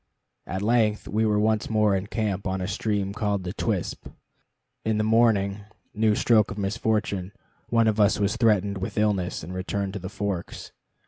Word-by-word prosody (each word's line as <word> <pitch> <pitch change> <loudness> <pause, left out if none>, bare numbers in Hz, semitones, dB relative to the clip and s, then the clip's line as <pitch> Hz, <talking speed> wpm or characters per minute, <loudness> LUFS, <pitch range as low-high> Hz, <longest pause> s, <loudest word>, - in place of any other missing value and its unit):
At 95 +1 -3
length 110 -2 +2
we 110 +1 +1
were 105 -1 +2
once 110 0 +1
more 105 -2 +3
in 95 +1 -2
camp 100 -3 -2
on 95 0 -1
a 90 - -3
stream 100 -1 -1
named 105 -5 -1
the 90 +1 -4
Twispt. 105 -5 -3 0.7
In 110 -1 0
the 110 - +1
morning 110 -3 +3 0.3
new 110 0 +2
stroke 110 -1 +3
of 100 - -6
misfortune 100 -2 -1 0.4
one 115 -1 +3
of 110 0 +1
us 105 0 +4
was 100 +1 +1
threatened 105 -4 +2
with 95 - -5
illness, 100 -6 0
and 90 +4 -7
returned 95 +1 -3
to 100 - -4
the 95 0 -6
Forks. 100 -4 -4
105 Hz, 180 wpm, -25 LUFS, 95-110 Hz, 0.7 s, us